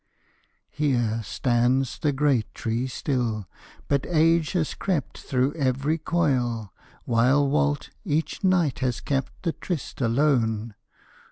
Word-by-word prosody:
_ -, -, -50 dB, 0.6 s
Here 120 Hz, -6 st, 0 dB
stands 125 Hz, +3 st, +1 dB
the 150 Hz, -, +1 dB
great 135 Hz, -5 st, +1 dB
tree 115 Hz, +3 st, -1 dB
still. 120 Hz, -6 st, -2 dB, 0.4 s
But 140 Hz, -1 st, 0 dB
age 165 Hz, -1 st, +3 dB
has 170 Hz, -5 st, 0 dB
crept 180 Hz, -7 st, -2 dB
Through 130 Hz, +2 st, 0 dB
every 145 Hz, +2 st, 0 dB
coil, 125 Hz, -, 0 dB, 0.3 s
while 125 Hz, +5 st, +3 dB
Walt 145 Hz, 0 st, 0 dB
each 155 Hz, -3 st, -2 dB
night 175 Hz, -7 st, +2 dB
has 125 Hz, -3 st, -1 dB
kept 135 Hz, -2 st, -3 dB
The 165 Hz, -3 st, 0 dB
tryst 170 Hz, -6 st, -5 dB
alone. 115 Hz, -3 st, +1 dB
135 Hz, 120 wpm, -25 LUFS, 120-150 Hz, 0.6 s, age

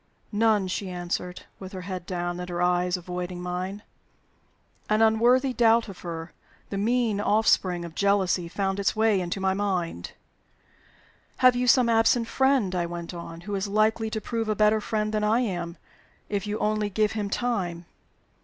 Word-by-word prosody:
"None," 210 Hz, -2 st, +2 dB
she 185 Hz, +1 st, -3 dB
answered, 180 Hz, 0 st, -4 dB, 0.2 s
with 190 Hz, 0 st, -9 dB
her 185 Hz, -, -5 dB
head 185 Hz, -2 st, -6 dB
down, 175 Hz, -1 st, -3 dB
and 180 Hz, 0 st, -6 dB
her 175 Hz, -1 st, -3 dB
eyes 180 Hz, +1 st, +2 dB
avoiding 180 Hz, 0 st, -5 dB
mine. 180 Hz, +3 st, -4 dB, 1.1 s
An 215 Hz, 0 st, +3 dB
unworthy 245 Hz, +4 st, +3 dB
doubt 230 Hz, -1 st, +4 dB
of 195 Hz, -3 st, -10 dB
her 165 Hz, -1 st, -6 dB, 0.4 s
the 200 Hz, -, -2 dB
mean 225 Hz, -1 st, +1 dB
offspring 190 Hz, -5 st, +2 dB
of 170 Hz, -, -9 dB
jealousy 190 Hz, -2 st, +1 dB
found 195 Hz, +2 st, -2 dB
its 200 Hz, -, +1 dB
way 215 Hz, -3 st, +3 dB
into 175 Hz, +2 st, -3 dB
my 190 Hz, 0 st, +1 dB
mind. 185 Hz, -, -2 dB, 1.2 s
"Have 255 Hz, -1 st, +5 dB
you 250 Hz, 0 st, 0 dB
some 250 Hz, 0 st, +5 dB
absent 230 Hz, +1 st, +3 dB
friend," 265 Hz, -6 st, +2 dB
I 175 Hz, -1 st, -1 dB
went 170 Hz, 0 st, -6 dB
on, 170 Hz, -1 st, -8 dB
"who 205 Hz, +3 st, -6 dB
is 195 Hz, 0 st, -1 dB
likely 215 Hz, +2 st, +1 dB
to 220 Hz, -, -3 dB
prove 225 Hz, +1 st, -3 dB
a 215 Hz, -, +1 dB
better 215 Hz, +1 st, +3 dB
friend 215 Hz, -1 st, -2 dB
than 215 Hz, 0 st, 0 dB
I 220 Hz, +3 st, +3 dB
am, 175 Hz, -6 st, -3 dB, 0.5 s
if 205 Hz, -1 st, -2 dB
you 210 Hz, +1 st, -2 dB
only 215 Hz, -1 st, 0 dB
give 210 Hz, +1 st, +1 dB
him 210 Hz, -2 st, -3 dB
time?" 190 Hz, -8 st, -2 dB
200 Hz, 175 wpm, -26 LUFS, 180-220 Hz, 1.2 s, Have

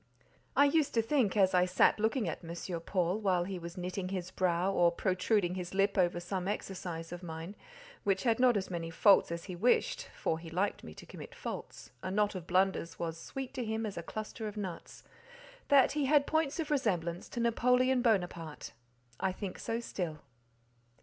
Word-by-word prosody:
I 285 Hz, -, +6 dB
used 290 Hz, -1 st, +2 dB
to 230 Hz, -, +3 dB
think, 225 Hz, -5 st, +1 dB
as 190 Hz, -2 st, +4 dB
I 180 Hz, 0 st, +5 dB
sat 185 Hz, +3 st, +3 dB
looking 220 Hz, 0 st, +1 dB
at 165 Hz, -, -4 dB
M. 170 Hz, +1 st, -5 dB
Paul, 180 Hz, +2 st, 0 dB
while 185 Hz, -4 st, +2 dB
he 185 Hz, 0 st, -5 dB
was 170 Hz, +2 st, -8 dB
knitting 185 Hz, +1 st, -3 dB
his 185 Hz, -1 st, -4 dB
brow 185 Hz, +1 st, +1 dB
or 175 Hz, -2 st, +4 dB
protruding 185 Hz, +1 st, +1 dB
his 180 Hz, 0 st, -5 dB
lip 200 Hz, +1 st, +2 dB
over 175 Hz, -2 st, +2 dB
some 180 Hz, +1 st, -3 dB
exercise 180 Hz, -5 st, -4 dB
of 175 Hz, 0 st, -6 dB
mine, 165 Hz, +2 st, -7 dB, 0.5 s
which 195 Hz, -1 st, +1 dB
had 230 Hz, -2 st, +2 dB
not 250 Hz, -3 st, +5 dB
as 190 Hz, -1 st, -3 dB
many 165 Hz, -1 st, -3 dB
faults 190 Hz, +2 st, +5 dB
as 170 Hz, 0 st, -4 dB
he 185 Hz, -, -6 dB
wished 225 Hz, +8 st, +2 dB
(for 160 Hz, -, -1 dB
he 165 Hz, 0 st, -9 dB
liked 185 Hz, +5 st, -1 dB
me 80 Hz, -, -10 dB
to -, -, -11 dB
commit -, -, -10 dB
faults: -, -, -7 dB
a 185 Hz, -, -4 dB
knot 205 Hz, +2 st, +1 dB
of 180 Hz, -3 st, -7 dB
blunders 185 Hz, -2 st, +1 dB
was 165 Hz, -1 st, -3 dB
sweet 270 Hz, +8 st, -6 dB
to 255 Hz, -2 st, -3 dB
him 220 Hz, 0 st, -2 dB
as 205 Hz, -, -4 dB
a -, -, -4 dB
cluster 215 Hz, +4 st, -6 dB
of 210 Hz, 0 st, -7 dB
nuts), 185 Hz, -5 st, -6 dB, 0.6 s
that 275 Hz, -2 st, +6 dB
he 295 Hz, -1 st, 0 dB
had 285 Hz, +1 st, +4 dB
points 315 Hz, 0 st, 0 dB
of 310 Hz, -2 st, -2 dB
resemblance 175 Hz, -, 0 dB
to -, -, -5 dB
Napoleon 250 Hz, +2 st, +3 dB
Bonaparte. 175 Hz, -, -1 dB, 0.5 s
I 190 Hz, -, +1 dB
think 185 Hz, 0 st, -6 dB
so 230 Hz, -, -2 dB
still. 170 Hz, -9 st, -4 dB
190 Hz, 195 wpm, -32 LUFS, 175-225 Hz, 0.6 s, I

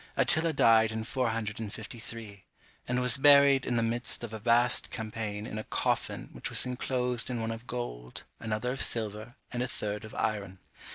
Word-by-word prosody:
Attila 160 Hz, +1 st, +4 dB
died 115 Hz, -6 st, +4 dB
in 110 Hz, 0 st, -3 dB
453, 110 Hz, -2 st, -4 dB, 0.4 s
and 125 Hz, 0 st, 0 dB
was 125 Hz, -2 st, +5 dB
buried 140 Hz, -1 st, +6 dB
in 120 Hz, -, 0 dB
the 115 Hz, -, +2 dB
midst 120 Hz, +1 st, -1 dB
of 115 Hz, -2 st, -6 dB
a 110 Hz, -, -5 dB
vast 120 Hz, +2 st, +3 dB
champaign 110 Hz, -2 st, -4 dB
in 110 Hz, -2 st, -5 dB
a -, -, -5 dB
coffin -, -, -2 dB
which -, -, -3 dB
was -, -, 0 dB
inclosed 125 Hz, -1 st, -1 dB
in 125 Hz, -2 st, -2 dB
one 115 Hz, 0 st, -2 dB
of 115 Hz, +2 st, -8 dB
gold, 60 Hz, -, -6 dB, 0.2 s
another 110 Hz, +2 st, -2 dB
of 135 Hz, -, -3 dB
silver, 110 Hz, +1 st, -1 dB, 0.2 s
and 120 Hz, -, -3 dB
a 125 Hz, -, 0 dB
third 105 Hz, -2 st, -4 dB
of 110 Hz, -, -10 dB
iron. 100 Hz, -4 st, -2 dB
115 Hz, 175 wpm, -29 LUFS, 110-125 Hz, 0.4 s, buried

